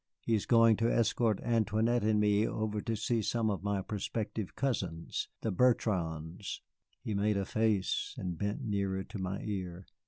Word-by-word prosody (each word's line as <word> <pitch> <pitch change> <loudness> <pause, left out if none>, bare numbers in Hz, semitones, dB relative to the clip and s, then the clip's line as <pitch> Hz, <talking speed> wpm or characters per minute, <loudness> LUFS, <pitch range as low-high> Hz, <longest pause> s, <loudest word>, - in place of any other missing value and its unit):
He 115 - -1
is 105 - +1
going 115 -2 +6
to 115 +2 +2
escort 115 -2 +2
Antoinette 115 0 +2
and 105 0 +3
me 105 +1 +3
over 105 -1 -2
to 115 - -2
see 110 +1 0
some 110 +1 +1
of 100 - -3
my 100 -1 -1
prospective 105 0 -3
cousins, 90 -12 -2
the 110 - -1
Bertrands." 90 -6 0 0.4
He 110 - -2
made 100 +1 +1
a 100 - 0
face, 110 -2 0
and 90 -2 -3
bent 100 +5 -2
nearer 100 -2 -1
to 100 - -8
my 95 +1 -3
ear. 95 -3 -4
105 Hz, 165 wpm, -32 LUFS, 95-110 Hz, 0.4 s, going